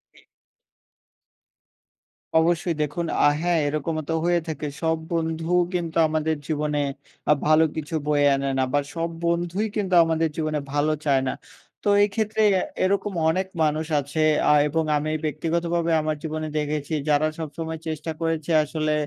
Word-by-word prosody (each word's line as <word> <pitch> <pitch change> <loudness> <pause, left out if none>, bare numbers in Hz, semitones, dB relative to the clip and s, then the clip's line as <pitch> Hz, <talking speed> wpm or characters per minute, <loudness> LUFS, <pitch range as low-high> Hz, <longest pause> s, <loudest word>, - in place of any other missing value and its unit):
জি। - - -19 2.2
অবশ্যই। 170 +1 +1
দেখুন 150 +3 -2 0.2
আ - - +8
হ্যাঁ, 175 -1 +2
এরকমও 155 +2 -2
তো - - +1
হয়ে 175 0 +3
থাকে 155 -1 -4
সব 160 -1 +1
বন্ধুও 165 +1 0
কিন্তু 170 -2 -2
আমাদের 155 0 0
জীবনে 150 -1 -1 0.5
আ - - +8
ভালো 155 +1 +6
কিছু 155 +1 -4
বয়ে 145 -1 +3
আনে 135 0 -2
না। - - +2
আবার 145 +2 0
সব 165 0 -1 0.2
বন্ধুই 175 +5 0
কিন্তু 195 -3 -1
আমাদের 165 0 +1
জীবনে 155 -1 -1
ভালো 145 +1 +2
চায় 135 -2 +3
না। - - 0 0.5
তো - - +1
এই - - +4
ক্ষেত্রে 220 -1 0
অ্যা 185 - +2 0.2
এরকম 200 +2 0 0.2
অনেক 185 +3 0 0.2
মানুষ 155 +1 0
আছে 145 +3 -3 0.3
আ - - +6
এবং 160 +2 0
আমি 155 +1 -2
ব্যক্তিগতভাবে 170 +2 -1
আমার 155 0 -1
জীবনে 155 0 -3
দেখেছি, 150 0 -2 0.2
যারা 150 +1 +3
সবসময় 160 +1 -5
চেষ্টা 160 0 -3
করেছে 165 0 -1
আসলে 155 0 -1
160 Hz, 155 wpm, -24 LUFS, 150-170 Hz, 2.2 s, আ